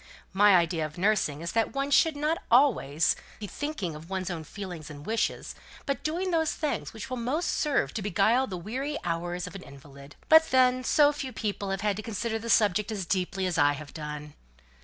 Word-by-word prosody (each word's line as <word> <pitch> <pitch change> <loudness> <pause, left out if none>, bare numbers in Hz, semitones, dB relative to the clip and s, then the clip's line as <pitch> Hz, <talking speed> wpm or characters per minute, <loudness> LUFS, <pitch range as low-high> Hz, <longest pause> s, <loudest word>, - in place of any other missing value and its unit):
My 205 0 +6
idea 170 -2 +2
of 155 +1 -6
nursing 185 -6 +1
is 170 0 -4
that 225 0 0
one 275 +1 -1
should 320 +2 +4
not 305 +3 0
be - - -25
always 215 - +3 0.2
thinking 210 - -4
of 155 +3 -11
one's 190 -1 -3
own 165 -2 -5
feelings 175 -3 -8
and 145 -1 -10
wishes, 225 +1 -1 0.3
but 275 - -2
doing 355 +4 -2
those 320 -2 +1
things 305 -2 -3
which 240 +4 -8
will 255 - -2
most 265 +9 -1
serve 295 -2 0
to 220 - -3
beguile 210 +6 +2
the 185 - -5
weary 265 - -4
hours 175 +1 -2
of 180 - -9
an 195 - -8
invalid. 140 0 -13
But 320 0 +6
then 255 0 +3
so 290 +2 +4
few 280 -3 -5
people 205 -4 -3
have 195 0 -2
had 205 -1 0
to - - -3
consider 225 +1 -3
the 230 +1 -7
subject 210 -1 +3
so 215 - -3
deeply 190 +1 -1
as 175 -3 -1
I 145 0 +5
have 145 0 -9
done!" 150 -1 -7
205 Hz, 205 wpm, -28 LUFS, 170-260 Hz, 0.3 s, My